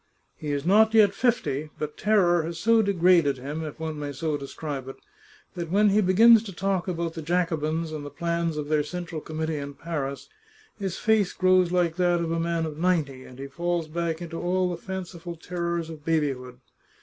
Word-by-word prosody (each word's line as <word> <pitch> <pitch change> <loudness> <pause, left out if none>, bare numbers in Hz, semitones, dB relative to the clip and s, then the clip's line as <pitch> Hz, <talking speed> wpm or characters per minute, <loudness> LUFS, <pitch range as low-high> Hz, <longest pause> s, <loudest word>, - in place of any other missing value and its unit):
He 150 - -5
is 145 +1 -2
not 220 +4 +5
yet 205 -3 +6
fifty, 155 - 0
but 150 -1 -4
terror 185 -5 +3
has 165 +1 -5
so 225 +5 +4
degraded 175 -7 +3
him, 145 +5 -5
if 155 0 -7
one 160 -1 -4
may 145 -1 -4
so 150 +2 -2
describe 140 -1 -5
it, 135 - -7 0.6
that 170 -4 -5
when 205 +4 +4
he 205 +2 +4
begins 220 +4 +7
to 200 - -6
talk 190 0 -1
about 170 -2 -2
the 165 - -6
Jacobins 160 -1 -1
and 155 -2 -5
the 145 - -6
plans 170 +1 -2
of 150 -1 -3
their 155 0 +2
Central 165 0 -5
Committee 160 0 -3
in 140 0 -6
Paris 140 -4 -4 0.5
his 190 -3 -3
face 215 -3 +2
grows 185 -1 +3
like 175 -2 +1
that 175 -1 +2
of 165 -1 -2
a 165 - 0
man 165 0 0
of 155 -1 -6
ninety, 155 -7 0
and 125 - -13
he 135 - -6
falls 170 +3 -2
back 165 +1 -3
into 165 -1 -6
all 180 +1 +1
the 175 - -6
fanciful 180 -2 -6
terrors 170 0 -3
of 160 -2 -10
babyhood. 135 -6 -1
170 Hz, 195 wpm, -26 LUFS, 150-180 Hz, 0.6 s, begins